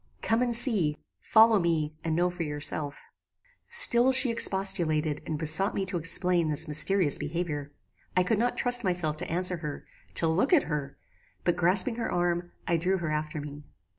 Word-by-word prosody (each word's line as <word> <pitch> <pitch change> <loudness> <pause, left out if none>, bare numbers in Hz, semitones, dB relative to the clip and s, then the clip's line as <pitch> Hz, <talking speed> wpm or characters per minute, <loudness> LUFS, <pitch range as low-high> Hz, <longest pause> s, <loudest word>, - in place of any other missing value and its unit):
"Come 225 +2 0
and 240 -1 -1
see. 200 - +1 0.2
Follow 220 -1 +3
me, 160 -3 -2
and 160 -1 -3
know 175 +1 -1
for 180 -1 -9
yourself." 145 -1 0 0.7
"Still 265 - +5
she 260 -1 +3
expostulated 165 -8 +1
and 155 - -4
besought 160 +6 +2
me 195 - -3
to 180 -1 -5
explain 170 0 0
this 150 +2 0
mysterious 155 +1 +4
behaviour. 150 -2 -6 0.5
I 185 - +3
could 210 +3 -2
not 245 +2 -2
trust 245 -1 +2
myself 175 -5 -2
to 175 - -6
answer 180 +1 -1
her; 150 -3 -8 0.3
to 165 - -1
look 185 - -1
at 325 - +3
her; 145 -3 -6 0.5
but 175 - -1
grasping 185 +7 +2
her 235 - -4
arm, 175 0 -3 0.2
I 170 - 0
drew 185 +4 -2
her 165 -4 -5
after 155 0 -5
me. 145 0 -10
175 Hz, 175 wpm, -26 LUFS, 155-195 Hz, 0.7 s, Still